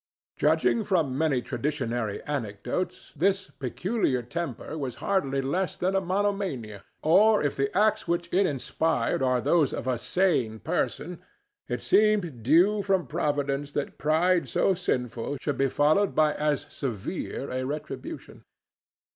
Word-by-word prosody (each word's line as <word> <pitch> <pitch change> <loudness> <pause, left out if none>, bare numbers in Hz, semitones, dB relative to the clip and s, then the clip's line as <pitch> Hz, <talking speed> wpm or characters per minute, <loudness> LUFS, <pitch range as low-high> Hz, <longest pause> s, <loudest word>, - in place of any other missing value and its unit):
Judging 230 - +2
from 165 -10 +1
many 140 -4 +1
traditionary 120 -5 -2
anecdotes, 135 - -4
this 190 +5 +1
peculiar 135 - -1
temper 170 +5 -5
was 135 -6 -4
hardly 135 -4 0
less 175 +6 -1
than 185 +2 0
a 195 - +3
monomania; 185 - -2 0.2
or 210 +6 +5
if 145 - 0
the 140 0 0
acts 215 -2 +2
which 170 0 0
it 190 +1 +4
inspired 145 -2 0
were 130 -1 +2
those 150 +4 +2
of - - -4
a 130 -2 0
sane 130 - +1
person, - - -2 0.5
it - - -3
seemed 200 - +2
due 175 - +4
from 190 -4 +1
Providence 145 -2 -1
that 145 - -3
pride 160 0 +2
so 190 - +2
sinful 125 -6 -2
should 145 - -3
be 135 - +3
followed 155 +9 +2
by 155 -1 +4
as 150 -1 0
severe 135 - -4
a 130 0 -2
retribution. 150 +3 -6
150 Hz, 140 wpm, -27 LUFS, 130-185 Hz, 0.5 s, or